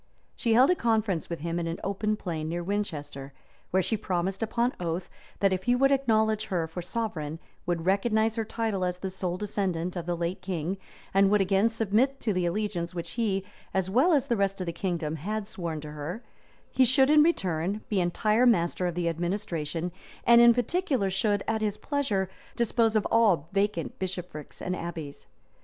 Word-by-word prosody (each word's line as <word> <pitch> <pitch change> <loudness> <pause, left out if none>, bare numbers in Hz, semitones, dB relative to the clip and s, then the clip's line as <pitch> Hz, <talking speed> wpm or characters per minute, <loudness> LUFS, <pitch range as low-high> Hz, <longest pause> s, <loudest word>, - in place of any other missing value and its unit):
She 230 -3 +1
held 255 +7 +6
a - - +3
conference 220 - 0
with 170 -3 -4
him 170 +1 -2
in 170 - -2
an 165 - -4
open 205 +2 0
plain 160 -6 -4
near 175 +1 -2
Winchester; 145 -8 -4 0.4
where 190 0 +2
she 220 - +1
promised 190 -1 -2
upon 235 +3 0
oath, 175 +1 -3 0.3
that 195 -1 +4
if 185 0 -3
he 245 - +4
would 275 +2 +4
acknowledge 220 -5 +2
her 175 -4 -1
for 160 +3 -6
sovereign, 170 -7 -3 0.3
would 170 -2 -1
recognize 220 +3 +2
her 225 - 0
title 220 -3 -2
as 180 0 -1
the 190 +1 -4
sole 180 -1 -3
descendant 185 -4 -2
of 175 -1 -4
the 175 -1 -1
late 170 +2 -2
king, 185 0 -3 0.3
and 195 0 +5
would 210 +1 +4
again 195 +3 +3
submit 225 +5 +1
to 215 - 0
the 180 -1 +1
allegiance 180 -2 -2
which 170 -1 -4
he, 205 -5 0 0.3
as 190 -1 0
well 265 - +4
as 285 -5 +3
the 240 - +1
rest 195 -1 0
of 185 - -2
the 170 - -3
kingdom, 165 -5 -2
had 210 +7 -3
sworn 170 -6 -4
to 150 0 -8
her, 150 +9 -6 0.5
he 260 - +4
should 265 +3 +5
in 305 0 +7
return 195 - +1
be 200 -3 +1
entire 215 +7 +2
master 180 -4 +2
of 175 - -3
the 175 -1 -1
administration, 170 -1 -2 0.3
and 235 0 +8
in 235 0 +9
particular 245 - 0
should, 205 +1 +1
at 220 0 0
his 210 -1 -1
pleasure, 215 -7 -1 0.3
dispose 230 -1 +2
of 215 - +2
all 195 -9 +3
vacant 200 -3 -1
bishoprics 180 -5 -6
and 180 0 -1
abbeys. 165 -5 -7
195 Hz, 190 wpm, -28 LUFS, 175-220 Hz, 0.5 s, in